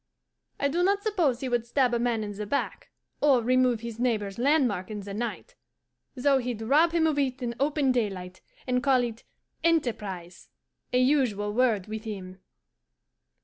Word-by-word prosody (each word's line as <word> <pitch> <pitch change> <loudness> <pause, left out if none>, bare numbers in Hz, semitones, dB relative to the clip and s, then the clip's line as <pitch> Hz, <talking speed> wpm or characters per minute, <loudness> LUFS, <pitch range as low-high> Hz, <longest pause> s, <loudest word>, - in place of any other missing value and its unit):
I 280 - +2
do 330 +5 0
not 400 +2 +2
suppose 340 - +1
he 265 - -2
would 240 -1 0
stab 250 0 +2
a 235 - +1
man 235 -2 0
in 205 - -5
the 205 +1 -6
back, 280 - -3 0.3
or 270 -5 +4
remove 250 -1 +2
his 235 -1 -7
neighbour's 215 -5 -1
landmark 250 - +2
in 210 -1 -5
the 200 0 -7
night, 240 - -4 0.6
though 270 +1 +3
he'd 240 -3 -4
rob 300 +8 +4
him 330 -1 +2
of 305 -2 +1
it 260 -2 0
in 235 -1 -2
open 280 -1 +2
daylight, 190 -7 -3 0.2
and 250 -1 +1
call 265 -2 +3
it 235 -1 -5 0.4
"enterprise" 210 - -1 0.4
a 250 - +2
usual 250 -7 +2
word 225 -5 +2
with 220 +1 -6
him. 190 -3 -7
245 Hz, 170 wpm, -27 LUFS, 215-275 Hz, 0.6 s, or